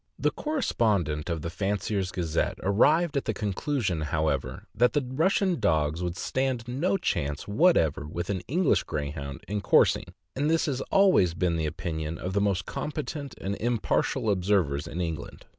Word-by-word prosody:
The -, -, +1 dB
correspondent 100 Hz, -, 0 dB
of 80 Hz, -3 st, -2 dB
the 85 Hz, -, -3 dB
Fancier' 100 Hz, +2 st, -1 dB
s 95 Hz, -1 st, -2 dB
Gazette 85 Hz, -5 st, -1 dB
arrived 150 Hz, -, +3 dB
at 140 Hz, -, 0 dB
the 110 Hz, -, -1 dB
conclusion, 105 Hz, -, -1 dB
however, 75 Hz, -3 st, -1 dB
that 120 Hz, +3 st, +3 dB
the 145 Hz, -3 st, +1 dB
Russian 175 Hz, +6 st, +1 dB
dogs 80 Hz, -5 st, +1 dB
would 90 Hz, 0 st, -3 dB
stand 130 Hz, -1 st, -1 dB
no 145 Hz, +11 st, 0 dB
chance 75 Hz, -, -2 dB
whatever 100 Hz, -, +3 dB
with 85 Hz, +4 st, -4 dB
an 95 Hz, -3 st, -2 dB
English 175 Hz, +2 st, +2 dB
Greyhound 70 Hz, -1 st, -5 dB
in 105 Hz, 0 st, -2 dB
cours -, -, +5 dB
ing; -, -, -7 dB, 0.3 s
and 145 Hz, +3 st, 0 dB
this 165 Hz, 0 st, +2 dB
has 135 Hz, -3 st, -2 dB
always 185 Hz, -, +4 dB
been 85 Hz, -1 st, +1 dB
the 80 Hz, -1 st, -1 dB
opinion 80 Hz, -1 st, -4 dB
of 90 Hz, +3 st, -4 dB
the 100 Hz, -, +2 dB
most 95 Hz, -3 st, 0 dB
com 150 Hz, -, -4 dB
petent 145 Hz, -2 st, -5 dB
and 100 Hz, +1 st, -3 dB
impartial 120 Hz, 0 st, 0 dB
observers 90 Hz, -6 st, +1 dB
in 85 Hz, +2 st, -4 dB
England. 80 Hz, -4 st, -5 dB
100 Hz, 175 wpm, -27 LUFS, 80-130 Hz, 0.3 s, cours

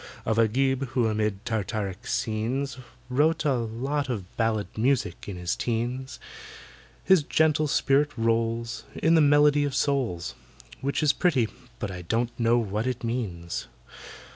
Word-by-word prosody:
Of 110 Hz, 0 st, +1 dB
AGIB, 135 Hz, +4 st, +2 dB
who, 125 Hz, -3 st, +2 dB
amid 105 Hz, -1 st, -1 dB
Tartaric 105 Hz, -1 st, -3 dB
scenes, 125 Hz, +4 st, -1 dB, 0.3 s
Wrote 155 Hz, +5 st, +2 dB
a 145 Hz, -, +3 dB
lot 130 Hz, +4 st, -2 dB
of 100 Hz, -7 st, -5 dB
ballet 115 Hz, -3 st, +1 dB
music 120 Hz, -6 st, 0 dB
in 100 Hz, -, -5 dB
his 90 Hz, -1 st, -2 dB
teens: 120 Hz, +3 st, -3 dB, 0.8 s
His 190 Hz, -4 st, +5 dB
gentle 155 Hz, +1 st, +2 dB
spirit 145 Hz, +1 st, +3 dB
rolls 115 Hz, 0 st, 0 dB
In 165 Hz, -, +2 dB
the 160 Hz, -, +6 dB
melody 145 Hz, 0 st, +5 dB
of 145 Hz, -2 st, -2 dB
souls— 125 Hz, -, 0 dB, 0.5 s
Which 140 Hz, +4 st, -1 dB
is 150 Hz, -1 st, +4 dB
pretty, 135 Hz, -, +2 dB, 0.3 s
but 105 Hz, -4 st, -4 dB
I 90 Hz, -1 st, -6 dB
don't 115 Hz, +7 st, -1 dB
know 115 Hz, 0 st, +4 dB
what 110 Hz, 0 st, -1 dB
it 125 Hz, -1 st, -3 dB
means. 100 Hz, -8 st, -3 dB
120 Hz, 140 wpm, -26 LUFS, 110-140 Hz, 0.8 s, the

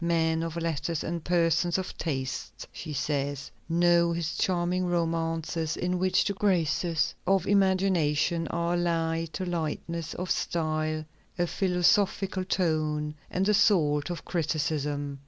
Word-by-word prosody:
"Men 165 Hz, -1 st, +1 dB
of 165 Hz, -1 st, -4 dB
letters 165 Hz, -1 st, -2 dB
and 170 Hz, -1 st, -3 dB
persons 170 Hz, 0 st, +2 dB
of 185 Hz, -, -4 dB
taste," 135 Hz, -4 st, -4 dB
she 155 Hz, -, -7 dB
says, 140 Hz, -1 st, -2 dB, 0.2 s
"know 170 Hz, 0 st, +4 dB
his 170 Hz, -1 st, -2 dB
charming 180 Hz, 0 st, 0 dB
romances, 165 Hz, -1 st, -1 dB
in 180 Hz, 0 st, -1 dB
which 185 Hz, 0 st, +2 dB
the 200 Hz, -, 0 dB
graces 175 Hz, -4 st, +1 dB
of 195 Hz, 0 st, +3 dB
imagination 185 Hz, -5 st, +2 dB
are 170 Hz, +1 st, -1 dB
allied 165 Hz, -1 st, 0 dB
to 185 Hz, -, -3 dB
lightness 170 Hz, -1 st, -3 dB
of 180 Hz, 0 st, -3 dB
style, 155 Hz, -1 st, -1 dB, 0.3 s
a 175 Hz, -, +2 dB
philosophical 190 Hz, +1 st, +1 dB
tone, 155 Hz, -4 st, 0 dB, 0.2 s
and 185 Hz, +1 st, 0 dB
the 210 Hz, -, +3 dB
salt 150 Hz, -8 st, +3 dB
of 175 Hz, -, -5 dB
criticism. 150 Hz, -4 st, -2 dB
170 Hz, 130 wpm, -28 LUFS, 155-180 Hz, 0.3 s, know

